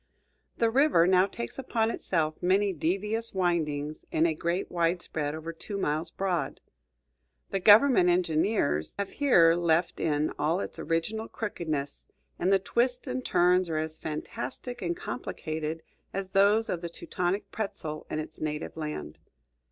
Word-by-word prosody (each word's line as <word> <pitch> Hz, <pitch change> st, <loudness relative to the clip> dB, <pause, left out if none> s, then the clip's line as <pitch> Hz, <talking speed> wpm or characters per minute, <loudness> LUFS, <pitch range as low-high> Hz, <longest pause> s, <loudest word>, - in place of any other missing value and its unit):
The 230 Hz, -1 st, +2 dB
river 270 Hz, -, +4 dB
now 185 Hz, +1 st, +4 dB
takes 120 Hz, -, -6 dB
upon 230 Hz, -3 st, 0 dB
itself 155 Hz, -7 st, -1 dB
many 195 Hz, +2 st, +2 dB
devious 200 Hz, +8 st, -1 dB
windings 155 Hz, -5 st, -1 dB
in 160 Hz, -, +3 dB
a 165 Hz, -, +2 dB
great 170 Hz, +4 st, -2 dB
widespread 165 Hz, -3 st, -1 dB
over 160 Hz, +1 st, -6 dB
two 200 Hz, +5 st, -6 dB
miles 160 Hz, -2 st, -1 dB
broad. 185 Hz, -1 st, -2 dB, 0.9 s
The 195 Hz, -, 0 dB
government 210 Hz, -1 st, +7 dB
engineers 165 Hz, -, +1 dB
have 200 Hz, -1 st, -3 dB
here 175 Hz, -13 st, +5 dB
left 170 Hz, 0 st, +1 dB
it -, -, -1 dB
in 150 Hz, 0 st, +1 dB
all 160 Hz, +5 st, +1 dB
its -, -, -5 dB
original 170 Hz, +8 st, -1 dB
crookedness, 155 Hz, -9 st, -4 dB, 0.3 s
and 180 Hz, +2 st, +2 dB
the 195 Hz, -, +6 dB
twists 245 Hz, +6 st, 0 dB
and 255 Hz, 0 st, -3 dB
turns 180 Hz, -2 st, +3 dB
are 160 Hz, -, -1 dB
as 155 Hz, 0 st, -3 dB
fantastic 245 Hz, -, -5 dB
and 170 Hz, -1 st, -2 dB
complicated 155 Hz, +1 st, -4 dB, 0.3 s
as 195 Hz, -1 st, -3 dB
those 205 Hz, +3 st, +4 dB
of 170 Hz, -, -2 dB
the 170 Hz, -, -4 dB
Teutonic 180 Hz, +3 st, -3 dB
pretzel 160 Hz, -8 st, -5 dB
in -, -, -3 dB
its 155 Hz, 0 st, -6 dB
native 150 Hz, 0 st, -3 dB
land. 155 Hz, -1 st, -5 dB
175 Hz, 150 wpm, -28 LUFS, 155-200 Hz, 0.9 s, government